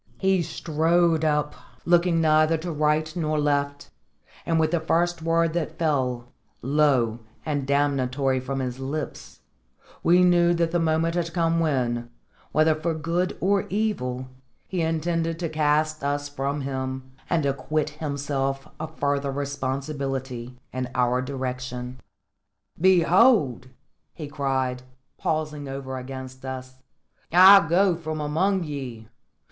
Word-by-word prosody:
He 190 -1 +2
strode 165 +1 +1
up, 150 -1 +1 0.3
looking 175 -1 +3
neither 155 +1 +4
to 170 +2 -5
right 155 +1 0
nor 155 -3 0
left, 145 -1 -1 0.6
and 165 -1 +2
with 155 -1 +2
the 170 - +2
first 170 +1 0
word 165 0 +1
that 160 -1 -3
fell, 125 -6 -1 0.3
low 130 -5 +2 0.3
and 145 -3 -2
damnatory, 135 -2 +1
from 135 +1 -3
his 125 0 -4
lips, 145 +3 -6 0.6
we 180 +2 +5
knew 175 -1 +4
that 170 -1 0
the 175 - +1
moment 165 0 +1
had 170 -1 -1
come 165 -1 +1
when, 120 -7 0 0.4
whether 155 +1 +4
for 160 +1 -2
good 170 +3 -1
or 195 +1 +1
evil, 130 -12 -2 0.4
he 185 -2 -2
intended 165 0 -1
to 170 -1 -3
cast 155 0 +1
us 145 0 -1
from 140 0 -3
him 130 -1 -4 0.2
and 160 -4 +1
acquit 150 +2 -1
himself 140 -2 -3
of 160 0 -7
further 140 -1 0
responsibility 135 -2 -4 0.2
in 130 0 -3
our 125 0 +2
direction. 125 -1 -5 0.8
"Behold!" 180 - +4 0.5
he 150 - -6
cried, 135 -3 -1 0.4
pausing 150 -3 -2
over 135 -1 -5
against 130 0 -8
us, 130 0 -7 0.5
"I 185 +1 +8
go 185 +1 +4
from 155 -2 -5
among 175 +6 +1
ye! 130 -7 -6
150 Hz, 130 wpm, -25 LUFS, 135-165 Hz, 0.8 s, I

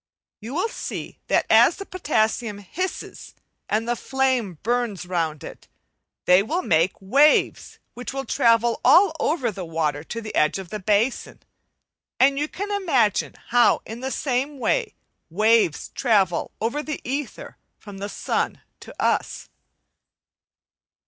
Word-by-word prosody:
You 230 +6 -7
will 365 +7 +1
see - - -7
that - - +2
as - - +5
the 395 - -8
potassium 220 - -1
hisses 355 - -6 0.3
and 220 +2 0
the 240 - 0
flame 255 - -1
burns 235 -4 -1
round 165 -4 -2
it, - - -11 0.6
they 180 +1 +6
will 330 - -2
make 165 - +1
waves 275 +10 +2 0.2
which 245 - -6
will 270 0 -4
travel 230 +2 +2
all 360 -3 +6
over 280 -6 0
the 190 -2 -7
water 160 -3 -2
to 230 - -5
the 220 -1 -7
edge 150 - +2
of 190 -3 -8
the 215 - -5
basin,, 210 +6 -1 0.8
and 275 +1 +4
you 295 - -1
can 405 +6 -6
imagine 275 - +1
how 240 0 +4
in 225 +2 -8
the 260 +1 -4
same 270 +2 -2
way 455 - -1 0.3
waves 215 -2 +2
travel 200 -9 +1
over 235 +7 -1
the 305 -1 -5
ether 275 +1 -5 0.2
from 205 -2 -11
the 200 +1 -4
sun - - -2 0.2
to - - -12
us. - - -1
230 Hz, 140 wpm, -23 LUFS, 200-275 Hz, 0.8 s, they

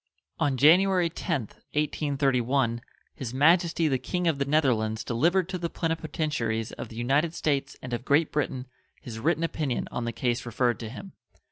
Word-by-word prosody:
On 140 -3 +1
January 175 +4 +5
10th, 150 - -3 0.2
1831 135 -5 +1 0.3
His 130 -2 -6
Majesty 165 +3 +4
the 135 -3 +1
King 180 +8 -2
of 155 -4 +1
the 140 - +1
Netherlands 120 -7 +1
delivered 170 +10 +1
to 185 -1 -3
the 170 -1 -2
plenipotentiaries 150 -9 -2
of - - -7
the 110 - -11
United 140 +8 +1
States 140 -5 -1
and 125 -1 -5
of 120 - -2
Great 145 +4 +2
Britain 135 -3 -2 0.3
his 110 -2 -8
written 160 +5 +1
opinion 150 -6 -2
on 120 - -3
the 115 - -1
case 120 +1 -1
referred 120 0 0
to 115 - -6
him. 190 - -9
140 Hz, 165 wpm, -27 LUFS, 120-165 Hz, 0.3 s, January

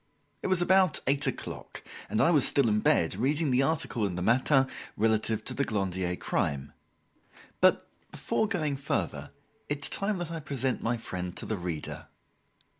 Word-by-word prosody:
It - - -2
was 185 -2 +2
about 190 +1 +4
eight 140 +2 +2
o'clock - - -6 0.3
and 110 - -1
I 170 - +4
was 150 -6 +5
still 140 -4 +3
in 105 0 +2
bed 85 -4 +2
reading 145 - +1
the 125 +1 +3
article 135 -5 0
in 95 -3 -1
the 90 - -3
"Matin" 130 +5 +3 0.3
relative 110 0 +1
to - - -3
the 140 - 0
Glandier 95 -6 -1
crime. 70 -4 -2 0.9
But, - - +4 0.2
before 220 - -1
going 155 -9 -1
further, 135 - -3 0.4
it 145 -1 -1
is - - +3
time 200 0 0
that 175 -2 -5
I 165 - -4
present 135 -3 -2
my 120 +1 0
friend 90 -5 -5
to - - -4
the 110 - -2
reader. 85 -4 -5
130 Hz, 175 wpm, -29 LUFS, 100-150 Hz, 0.9 s, was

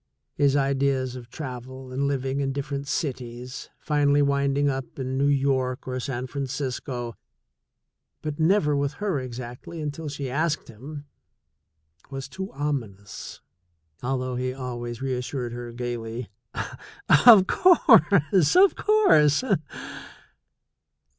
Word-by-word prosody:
His 140 -1 +2
ideas 135 -2 +1
of 120 -1 -9
travel 130 -1 -7
and 140 +2 0
living 135 0 -1
in 135 -1 -1
different 140 0 -4
cities, 125 -3 -4
finally 145 -1 +2
winding 140 0 +1
up 135 -2 -3
in 130 -1 -3
New 140 +1 +2
York 135 -3 +1
or 130 0 -2
San 125 -1 -3
Francisco, 130 -3 -4 1.1
but 150 0 -4
never 160 -3 +3
with 140 0 0
her 195 -3 -1
exactly 125 +5 -7
until 150 +1 -4
she 140 -1 -4
asked 155 +4 -1
him, 145 +6 -9 1.0
was 135 0 -6
too 190 +7 -6
ominous, 115 -9 -5 0.6
although 130 0 -2
he 130 +1 -2
always 120 -2 -5
reassured 125 -1 -3
her 120 0 -6
gaily: 120 -1 -5 1.0
"Of 215 -6 +10
course! 200 - +5
Of 385 +1 +6
course!" 255 - +4
135 Hz, 115 wpm, -25 LUFS, 125-145 Hz, 1.1 s, Of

